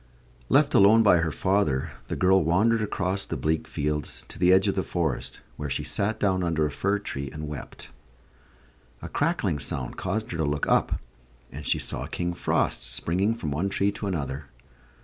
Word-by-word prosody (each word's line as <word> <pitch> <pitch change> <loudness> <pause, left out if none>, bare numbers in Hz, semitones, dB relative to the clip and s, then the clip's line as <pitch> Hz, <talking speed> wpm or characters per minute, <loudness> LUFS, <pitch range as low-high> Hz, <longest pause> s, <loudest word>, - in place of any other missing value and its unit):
Left - - +4
alone 110 +3 +7
by 100 -4 +6
her 80 -1 0
father, 80 -5 +1 0.2
the - - -3
girl 95 0 +4
wandered 105 +8 +3
across 100 -2 -1
the - - -4
bleak 80 +1 -1
fields 75 0 -3
to - - -8
the 90 0 +5
edge 95 +2 +5
of 100 - +2
the 95 - 0
forest, 85 -8 -2 0.2
where 75 -1 -4
she - - -2
sat 105 +2 0
down 95 -3 +2
under 80 -3 +1
a 75 - -1
fir 100 +2 0
tree 70 -9 -5
and 75 0 -6
wept. 75 -1 -8 1.1
A - - -4
crackling 75 - 0
sound - - -4
caused 105 +4 -2
her 85 - -3
to 80 - 0
look 75 -1 0
up, - - +2 0.5
and 70 -2 -7
she - - +2
saw - - -3
King 85 0 -2
Frost - - 0
springing 95 +7 0
from 80 -10 -4
one 85 +8 0
tree 100 +1 +1
to 100 0 -5
another. 70 -6 -3
90 Hz, 190 wpm, -26 LUFS, 75-100 Hz, 1.1 s, alone